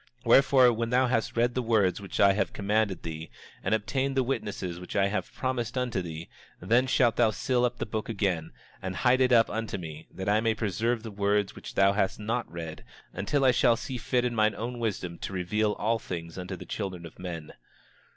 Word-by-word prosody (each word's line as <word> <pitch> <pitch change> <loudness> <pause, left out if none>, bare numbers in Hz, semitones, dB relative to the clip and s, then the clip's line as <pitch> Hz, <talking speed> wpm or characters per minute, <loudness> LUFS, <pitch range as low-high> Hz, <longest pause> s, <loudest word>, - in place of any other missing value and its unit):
27:22 - - -28
Wherefore, 130 0 +6
when 115 +1 -2
thou 125 +2 +3
hast 120 -2 -1
read 120 +1 +2
the 125 - 0
words 105 -6 +2
which 100 - -6
I 100 -1 +6
have 100 - -1
commanded 105 -1 0
thee, 80 0 -6 0.3
and - - +2
obtained 135 +5 -1
the 130 - +4
witnesses 105 -8 -3
which 90 - -8
I 100 -1 +3
have 95 -3 -3
promised 130 -2 -2
unto 125 -6 -1
thee, 85 -1 -7 0.3
then 115 +8 +2
shalt 120 -3 +3
thou 120 -2 +5
seal 125 +3 +1
up 125 0 -2
the - - -3
book 110 0 -4
again, 95 -7 -1 0.3
and 95 0 -4
hide 130 +5 +3
it 130 0 +4
up 115 -2 +6
unto 110 -2 -3
me, 80 -4 -8
that 95 - -6
I 105 +1 +3
may 115 -1 +1
preserve 110 +2 -1
the 110 - -6
words 100 0 0
which - - -9
thou 100 0 +5
hast 95 -1 0
not 115 +1 -2
read, 80 -2 -7 0.3
until 135 +9 0
I 130 - +7
shall 120 -1 +4
see 130 +2 -5
fit 125 +1 0
in 120 - 0
mine 110 -1 +2
own 120 +2 -4
wisdom 90 -7 -3
to - - -5
reveal 105 +4 0
all 110 +3 0
things 85 -4 -6
unto 90 0 -5
the - - -10
children 95 -5 -5
of 85 - -12
men. 85 -4 -6
110 Hz, 220 wpm, -28 LUFS, 95-120 Hz, 0.3 s, I